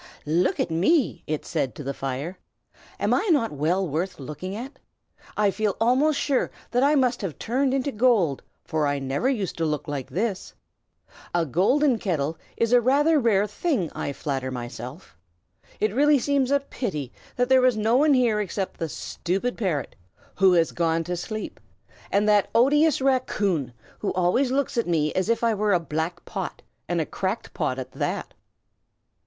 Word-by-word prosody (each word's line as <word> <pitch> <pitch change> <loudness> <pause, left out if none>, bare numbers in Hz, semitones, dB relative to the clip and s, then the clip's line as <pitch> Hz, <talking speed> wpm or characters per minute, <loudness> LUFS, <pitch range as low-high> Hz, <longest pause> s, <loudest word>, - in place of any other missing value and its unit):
"Look 170 +4 +1
at - - 0
me!" 230 - +2
it 155 -1 -3
said 135 -8 -2
to - - -7
the 140 +1 -3
fire. 135 +8 -4 0.6
"Am - - +1
I 430 - +1
not 280 -8 +2
well 165 +6 0
worth 165 +5 -3
looking 155 +8 -6
at? 255 +6 -8 0.6
I 205 -1 +3
feel 210 -1 -1
almost 265 +6 +3
sure 275 -3 +1 0.2
that 245 - +2
I 285 +3 +4
must 255 -3 +2
have 190 -7 -4
turned 260 +4 0
into 270 +1 0
gold, 210 - +2 0.2
for 155 -2 0
I 145 0 0
never 135 - -1
used 210 -9 -2
to - - +1
look 150 -1 -2
like 140 -3 -4
this. 200 0 -3 0.8
A 170 -1 +2
golden 235 - +2
kettle 160 -5 -2 0.2
is 230 +1 +1
rather 280 +6 +4
a - - +4
rare 210 -5 +3
thing, 210 - -1
I - - -4
flatter 135 -2 -3
myself. 125 - -7 0.6
It 215 -1 +1
really 290 +4 +5
seems 275 0 +1
a 280 0 +3
pity 155 - -4 0.2
that 245 0 +1
there 260 0 +5
is 255 -3 +4
no 220 +2 +2
one 290 +2 +5
here 235 -4 +2
except 195 -1 -4
the 165 -2 -2
stupid 195 +11 -3
parrot, 175 -11 -2 0.4
who 190 -1 +4
has 165 -2 +3
gone 165 -1 0
to 180 +2 -3
sleep, 215 +5 -5 0.5
and 205 +1 +2
that 210 -1 +4
odious 290 +5 +4
raccoon, 205 - +1 0.3
who 205 - -1
always 185 +9 +2
looks 265 -2 0
at 230 - -1
me 155 -3 +1
as 185 +3 0
if 230 0 +1
I 230 -1 +3
were 210 0 +1
a 180 - +4
black 165 +2 -4
pot, 190 -4 -5 0.3
and 175 -1 0
a 160 - 0
cracked 190 +7 -3
pot 130 - -1
at 130 -1 -6
that." - - -3
200 Hz, 180 wpm, -25 LUFS, 160-250 Hz, 0.8 s, really